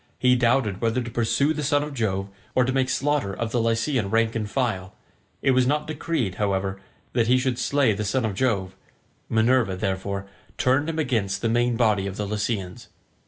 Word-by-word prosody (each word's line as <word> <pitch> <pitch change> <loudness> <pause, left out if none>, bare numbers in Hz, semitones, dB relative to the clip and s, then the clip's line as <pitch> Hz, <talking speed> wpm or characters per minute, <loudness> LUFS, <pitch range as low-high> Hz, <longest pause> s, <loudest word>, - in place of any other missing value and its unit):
He 125 0 +4
doubted 120 -5 +1
whether 115 +1 +1
to 120 - -7
pursue 130 +6 +1
the 150 - -3
son 145 0 +2
of 150 -1 -6
Jove, 100 -6 -1 0.3
or 130 - +4
to 130 - -1
make 130 -1 +1
slaughter 135 -4 0
of 115 +2 -3
the 120 - +1
Lycian 115 0 0
rank 115 +1 +2
and 105 -2 -2
file; 105 -8 -2 0.5
it - - +4
was 130 -1 +3
not 150 +2 +1
decreed, 150 - -2
however, 95 -1 -1 0.3
that 115 -2 +2
he 125 +2 +5
should 130 -1 -1
slay 140 -3 +2
the 105 +1 -3
son 115 +4 0
of 110 - -1
Jove; 95 -4 0 0.5
Minerva, 115 -2 +2
therefore, 95 +1 -3 0.3
turned 135 +5 +2
him 160 - -3
against 120 -11 -1
the 115 - +2
main 120 0 +1
body 105 -5 +2
of 95 - -6
the 105 - -2
Lycians. 100 -3 -3
115 Hz, 195 wpm, -24 LUFS, 100-130 Hz, 0.5 s, he